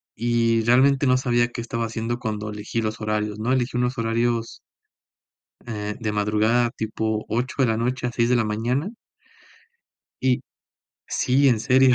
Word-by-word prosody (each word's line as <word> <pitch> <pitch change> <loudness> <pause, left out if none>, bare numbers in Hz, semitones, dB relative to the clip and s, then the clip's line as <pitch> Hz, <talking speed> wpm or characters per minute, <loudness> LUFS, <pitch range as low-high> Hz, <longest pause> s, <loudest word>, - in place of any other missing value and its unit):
y 115 0 +1
realmente 130 +4 +4
no 130 -1 +4
sabía 120 -2 +1
qué 120 - -6
estaba 115 0 -3
haciendo 115 +1 -3
cuando 105 -3 -4
elegí 105 +2 -3
los 110 0 -3
horarios, 105 -1 -2
¿no? 115 +4 -1
Elegí 125 -2 0
unos 125 +1 0
horarios 115 0 -1 1.1
eh, 105 -3 -4
de 110 -2 -2
madrugada, 110 +3 +2
tipo 110 -2 -2
8 120 +4 -2
de - - +4
la 110 -1 +1
noche 125 +2 -1
a 120 - -3
6 115 0 +1
de 125 - +3
la 115 - +2
mañana. 120 - -1 1.3
Y 130 -1 +3 0.7
sí, 135 +3 +2
en 120 -4 +2
serio. 130 +1 +5
115 Hz, 160 wpm, -23 LUFS, 110-125 Hz, 1.3 s, serio